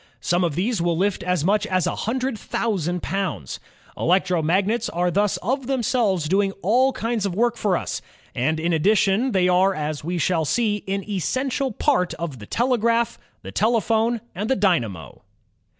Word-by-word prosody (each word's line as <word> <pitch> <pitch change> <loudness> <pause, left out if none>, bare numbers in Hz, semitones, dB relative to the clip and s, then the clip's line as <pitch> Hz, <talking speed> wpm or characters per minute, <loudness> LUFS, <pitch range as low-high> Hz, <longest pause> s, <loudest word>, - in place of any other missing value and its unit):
Some 175 +2 +1
of 165 -5 0
these 200 +3 0
will 170 -1 +1
lift 200 +2 0
as 180 -4 0
much 210 +3 +2
as 185 -3 +1
a - - -1
hun 230 +5 -2
dred 260 -1 -1
thousand 180 -6 -2
pounds. 190 - -3 0.4
Electromagnets 185 +5 +1
are 175 +1 0
thus 205 +2 +1
of 260 +5 -1
them 265 -3 0
selves 200 - +1
doing 195 +3 +1
all 250 +7 +3
kinds 230 -3 -2
of 180 - -4
work 235 +2 +2
for 200 -6 +1
us, - - -4 0.3
and 155 +6 0
in 170 +2 0
addition 200 - +2
they 185 -3 +2
are, 185 +2 +3
as 150 -2 -3
we 175 +3 -2
shall 165 0 +1
see, 210 +5 0
an 195 0 -2
essential 255 - -1
part 180 -4 +1
of 155 -6 -5
the 105 - -10
telegraph, 235 -1 +1 0.2
the - - -7
telephone, 225 +1 +1
and 205 +4 -3
the 265 - +3
dynamo. 115 - -1
195 Hz, 175 wpm, -23 LUFS, 175-230 Hz, 0.4 s, all